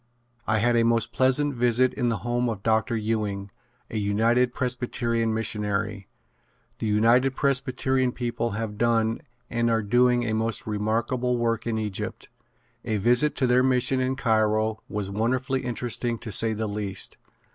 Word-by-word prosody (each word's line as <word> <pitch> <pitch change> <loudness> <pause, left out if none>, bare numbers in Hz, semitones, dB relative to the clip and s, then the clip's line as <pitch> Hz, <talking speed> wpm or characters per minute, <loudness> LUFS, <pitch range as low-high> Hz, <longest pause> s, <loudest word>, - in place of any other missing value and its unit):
I 110 - +2
had 120 +2 +2
a 115 - +4
most 115 -1 +1
pleasant 130 +3 +2
visit 125 +1 +2
in 120 -3 0
the 115 - 0
home 120 0 0
of 105 -3 -5
Dr. 110 +1 +1
Ewing, 105 -3 -2 0.4
a 110 - -3
United 115 +4 +2
Presbyterian 120 -2 -1
missionary. 105 -2 -2 0.7
The 110 - -2
United 120 +5 +3
Presbyterian 130 -2 0
people 120 -1 -2
have 110 -2 -5
done 115 0 +1 0.3
and 120 -1 0
are 115 -1 +1
doing 120 +3 +3
a 110 - -1
most 110 0 -1
remarkable 115 +4 -1
work 115 -1 -1
in 115 -1 -1
Egypt. 105 -3 -4 0.5
A 110 -2 -1
visit 125 +8 +3
to 130 - +1
their 125 0 +4
mission 130 0 +2
in 130 +1 0
Cairo 110 -3 +1
was 100 -2 -3
wonderfully 125 +5 -1
interesting 120 0 -2
to 110 -1 -7
say 110 +3 +4
the 110 +1 -3
least. 100 -2 -2
115 Hz, 155 wpm, -25 LUFS, 110-125 Hz, 0.7 s, a